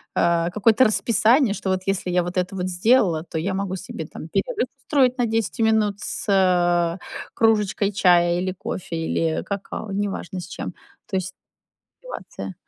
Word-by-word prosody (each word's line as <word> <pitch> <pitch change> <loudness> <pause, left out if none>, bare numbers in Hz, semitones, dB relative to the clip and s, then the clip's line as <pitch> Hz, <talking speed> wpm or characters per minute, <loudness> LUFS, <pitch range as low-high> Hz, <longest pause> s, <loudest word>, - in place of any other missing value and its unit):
э, 170 0 +2
какое-то 220 +5 +4
расписание, 230 +2 +3
что 195 - -4
вот 185 0 0
если 195 -2 -1
я 180 0 +3
вот 175 +1 -5
это 180 +1 0
вот 180 -1 -2
сделала, 185 -3 +3
то 170 -1 -6
я 185 +5 -1
могу 190 -1 -2
себе, 175 -4 -7
там, 155 - -9
перерыв 195 +7 -1
устроить 260 -2 +2
на 245 - +2
10 225 +1 -1
минут 220 -2 +2
с, - - -4
э, 175 -3 +3 0.4
кружечкой 210 -2 +2
чая 175 -2 +4
или 185 0 -1
кофе, 180 -2 -5
или 160 0 -1
какао, 200 +1 -5
неважно 195 -2 -3
с 175 - -9
чем. 175 - -6 0.3
То - - -5
есть 185 0 -2 0.7
ситуация - - -8
190 Hz, 165 wpm, -23 LUFS, 175-215 Hz, 0.7 s, какое-то